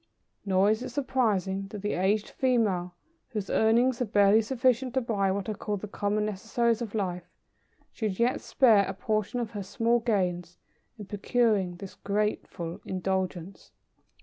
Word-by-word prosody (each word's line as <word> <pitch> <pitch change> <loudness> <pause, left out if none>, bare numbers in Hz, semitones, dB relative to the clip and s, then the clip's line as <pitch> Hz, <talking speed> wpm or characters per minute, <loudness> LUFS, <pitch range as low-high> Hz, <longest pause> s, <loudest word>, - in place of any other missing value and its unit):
Nor 195 +2 +4
is 220 +2 0
it 255 - -4
surprising 215 -8 0
that 205 0 -8
the 205 - -1
aged 200 +3 +1
female 205 -9 0 0.3
whose 210 -6 -4
earnings 235 +3 +3
are - - +2
barely 205 0 +4
sufficient 255 +2 +1
to 260 - +3
buy 205 -5 0
what 195 0 -2
are 215 - -1
called 205 -1 -4
the 210 - -5
common 205 +1 -1
necessaries 225 +3 0
of 225 -2 -5
life, 180 -4 -3 0.6
should 210 -5 -3
yet 240 +2 +1
spare 220 -7 +4
a - - -4
portion 215 +4 -1
of 230 -2 -3
her 205 -3 -5
small 230 +5 +1
gains 180 -6 -1 0.4
in 210 - -8
procuring 205 -2 +1
this 190 +2 -9
grateful 200 -4 -3
indulgence. 185 -1 -3
210 Hz, 155 wpm, -28 LUFS, 190-235 Hz, 0.6 s, Nor